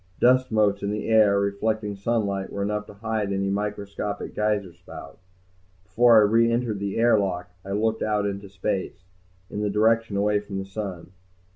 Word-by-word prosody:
Dust 130 0 +4
motes 105 -2 +2
in 100 - -2
the 105 0 -3
air, 105 -3 +5
reflecting 105 +1 -1
sunlight, 100 -2 -1
were 100 - -3
enough 105 +1 -2
to 105 - -12
hide 110 -1 -2
any 95 0 -1
microscopic 100 0 -4
geyser 105 -4 -1
spout. 90 +2 -12 0.6
Before 115 +5 +5
I - - +8
re 115 +3 +3
entered 115 -3 -1
the 100 -1 -3
air 115 -1 +4
lock 90 -2 -3
I 100 - -5
looked 110 +2 0
out 105 -1 0
into 100 0 -4
space, 95 -1 -3 0.5
in 105 - -3
the 105 - 0
direction 110 0 +2
away 105 +1 +2
from 100 -1 -7
the 95 - -4
sun. 95 -3 -6
105 Hz, 175 wpm, -25 LUFS, 100-110 Hz, 0.6 s, I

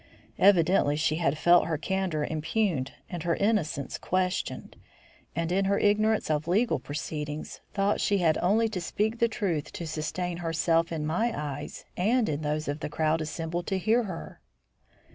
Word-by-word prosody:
Evidently 180 -5 +4
she 155 0 +1
had 155 -3 +1
felt 175 +2 +5
her 160 -2 0
candour 180 -2 -1
impugned 155 -2 -1 0.2
and 175 -2 -5
her 170 +1 +1
innocence 195 -10 0
questioned, 185 0 -2 0.6
and, 165 0 -1
in 195 +2 +2
her 200 +1 +2
ignorance 215 -2 +2
of 150 +1 0
legal 190 - +2
proceedings, 150 +2 -5
thought 200 0 +1
she 200 - +2
had 165 -4 +3
only 215 +6 +3
to 195 -5 -4
speak 220 +6 -1
the 235 - +4
truth 175 -9 -2
to 170 - -6
sustain 165 +3 -3
herself 165 0 +1
in 155 -2 -2
my 220 +10 +1
eyes 145 -1 -6
and 220 +4 +2
in 150 0 -2
those 155 0 -2
of 145 +2 -2
the - - -4
crowd 155 +1 +1
assembled 165 +2 -4
to 195 - 0
hear 225 +5 +2
her. 185 -5 -7
170 Hz, 165 wpm, -28 LUFS, 155-195 Hz, 0.6 s, felt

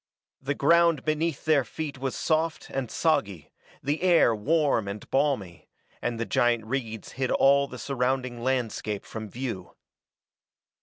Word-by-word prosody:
The 140 +1 -2
ground 170 0 +4
beneath 155 0 -1
their 155 -4 +4
feet 145 +3 -6
was 135 -1 -3
soft 160 0 -1
and 130 -3 -3
soggy, 100 - 0 0.3
the 145 +3 -1
air 175 -10 +5
warm 140 -1 +1
and 100 +1 -6
balmy, 135 - -1 0.3
and 120 -1 -2
the 115 - -1
giant 120 -2 +1
reeds 115 -3 -4
hid 130 -1 -2
all 140 +1 +4
the 125 - -9
surrounding 130 -1 -2
landscape 115 -5 -2
from 110 -1 -7
view. 115 -6 -6
130 Hz, 140 wpm, -27 LUFS, 115-150 Hz, 0.3 s, air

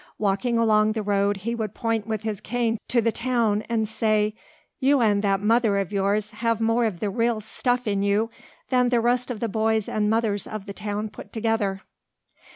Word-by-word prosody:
Walking 210 +4 0
along 215 -1 +3
the 220 -1 -2
road 200 0 +1
he 235 - 0
would 220 -3 -4
point 225 -2 -1
with 220 -1 -3
his 215 -3 -3
cane 230 -1 -1
to 235 -2 +2
the 230 - +2
town 230 -4 +1
and 220 -2 0
say, 215 -1 +1 0.5
"You 280 +1 +3
and 210 -4 +3
that 195 -1 +1
mother 220 -1 +3
of 195 0 -2
yours 200 +2 0
have 230 0 -1
more 225 +1 +2
of 200 -6 -3
the 205 -2 -1
real 230 0 +1
stuff 245 +3 -1
in 200 -2 0
you 205 +3 +1 0.4
than 250 -1 +3
the 240 -1 +3
rest 245 +2 +1
of 240 -4 -4
the 230 - -1
boys 220 0 0
and 210 -1 0
mothers 220 -3 0
of 215 -2 -6
the 200 - -7
town 210 +1 -3
put - - -12
together." 220 -4 -1
220 Hz, 200 wpm, -24 LUFS, 205-230 Hz, 0.5 s, along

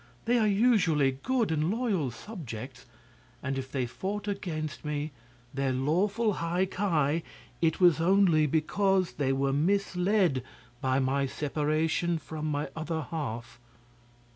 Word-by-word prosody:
They 240 +1 +3
are 215 - +3
usually 180 - +3
good 250 -7 +1
and 155 +1 +1
loyal 205 - 0
subjects, 130 - -8 0.6
and 135 0 -1
if 135 0 -5
they 130 -3 0
fought 200 - -4
against 155 -6 -4
me 150 0 -3 0.4
their 135 -1 0
lawful 195 - +1
High 175 +2 0
Ki 165 -5 0 0.4
it 160 -1 +2
was 175 -4 +5
only 175 -4 +4
because 185 +5 +1
they 135 -2 0
were 135 0 +1
misled 180 -1 +2 0.4
by 130 0 +1
my 135 +1 +1
separation 155 +4 0
from 155 0 -5
my 145 -2 -2
other 160 0 -3
half." 120 -6 -5
160 Hz, 130 wpm, -29 LUFS, 140-190 Hz, 0.6 s, was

